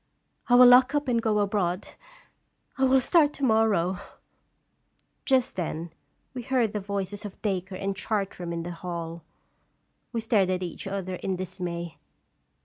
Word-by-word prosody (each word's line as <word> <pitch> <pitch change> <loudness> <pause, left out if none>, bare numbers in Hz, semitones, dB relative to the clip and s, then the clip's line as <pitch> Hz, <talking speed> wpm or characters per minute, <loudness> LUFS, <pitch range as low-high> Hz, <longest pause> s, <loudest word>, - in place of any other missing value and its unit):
I 245 - +6
will 250 +1 +9
lock 255 +3 +7
up 290 -1 0
and 235 -2 +1
go 220 -2 +1
abroad. 200 -3 0 0.9
I 265 - +2
will 265 0 +5
start 295 +2 +3
to 280 - -8
morrow! 215 -7 +2 0.6
" - - -38
Just 260 -3 +2
then 165 -2 -4 0.4
we 255 - -5
heard 245 -4 0
the 210 - -1
voices 200 +1 -4
of 205 -2 -8
Dacre 190 -2 -2
and 195 +1 -3
Chartram 195 -4 -3
in 170 0 -3
the 175 - -5
hall. 170 -1 -6 0.9
We 235 - -2
stared 215 -4 +2
at 185 0 -1
each 175 +2 -6
other 190 -2 -4
in 190 +1 -2
dismay. 175 -2 -5
195 Hz, 155 wpm, -26 LUFS, 180-235 Hz, 0.9 s, will